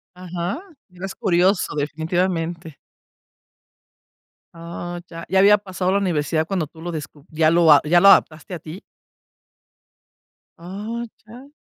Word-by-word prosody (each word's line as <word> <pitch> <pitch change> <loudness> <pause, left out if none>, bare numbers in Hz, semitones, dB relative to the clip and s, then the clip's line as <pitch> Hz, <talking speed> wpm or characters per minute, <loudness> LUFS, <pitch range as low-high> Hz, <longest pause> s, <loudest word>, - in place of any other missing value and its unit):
Ajá, 180 - -4 0.3
ibas 180 +1 -7
es - - -10
curioso 185 -2 +1
definitivamente. 165 +2 -2 1.8
Oh, 170 +1 -7
ya. 165 -1 -8
Ya 190 - +3
había 205 +2 +6
pasado 185 -2 -2
la 200 - +2
universidad 160 -4 0
cuando 185 -4 -1
tú 160 +2 -16
lo 175 - -5
descu 150 -2 -8
ya 155 0 +2
lo 170 -1 +5
a 145 - +7
ya 175 +3 +4
lo 200 - +5
adaptaste 160 -1 +3
a - - -7
ti. 160 +5 -10 1.8
Oh, 210 +7 -6 0.2
ya. 250 +6 -13
175 Hz, 135 wpm, -21 LUFS, 160-190 Hz, 1.8 s, a